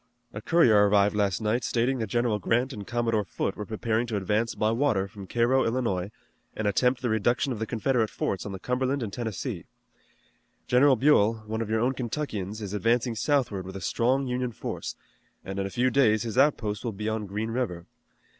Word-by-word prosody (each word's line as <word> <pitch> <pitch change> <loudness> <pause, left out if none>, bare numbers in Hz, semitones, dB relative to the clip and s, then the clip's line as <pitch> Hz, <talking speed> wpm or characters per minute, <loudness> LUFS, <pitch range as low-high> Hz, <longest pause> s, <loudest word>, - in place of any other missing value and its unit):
A 105 - -6
courier 110 -10 +5
arrived 100 0 +3
last 100 -3 +1
night 110 +3 0
stating 125 +2 0
that 110 - -2
General 120 -3 0
Grant 120 +7 0
and 100 -5 -8
Commodore 115 -3 0
Foote 95 - -3
were 105 - -6
preparing 110 +1 -1
to 110 -3 -2
advance 105 +4 0
by 110 +1 +1
water 115 -6 +1
from 100 -1 -11
Cairo, 120 +5 +2
Illinois, 115 -6 -1 0.5
and 110 - -3
attempt 125 +5 +1
the 120 - +1
reduction 120 +5 +1
of 110 - -6
the 110 - -3
Confederate 115 -1 0
forts 95 - -2
on 100 - -6
the 95 - -5
Cumberland 130 +5 -1
and 100 -3 -5
Tennessee. 110 -4 -4 1.0
General 130 +2 +5
Buell, 115 -4 +3
one 110 +1 -3
of 110 - -3
your 110 0 +1
own 125 +3 +2
Kentuckians, 110 -6 -4
is 100 -1 -5
advancing 115 +4 +1
southward 115 -4 0
with 95 +1 -9
a - - -4
strong 130 +4 +1
Union 125 -1 -2
force, - - -5 0.5
and 95 +1 -4
in 95 - -1
a - - -6
few 125 +5 +1
days 110 -5 +3
his 115 -1 -4
outposts 115 -7 +2
will 115 -3 -3
be 105 +2 -5
on 110 -1 -2
Green 105 +3 -3
River. 100 -9 -3
115 Hz, 200 wpm, -27 LUFS, 105-125 Hz, 1.0 s, courier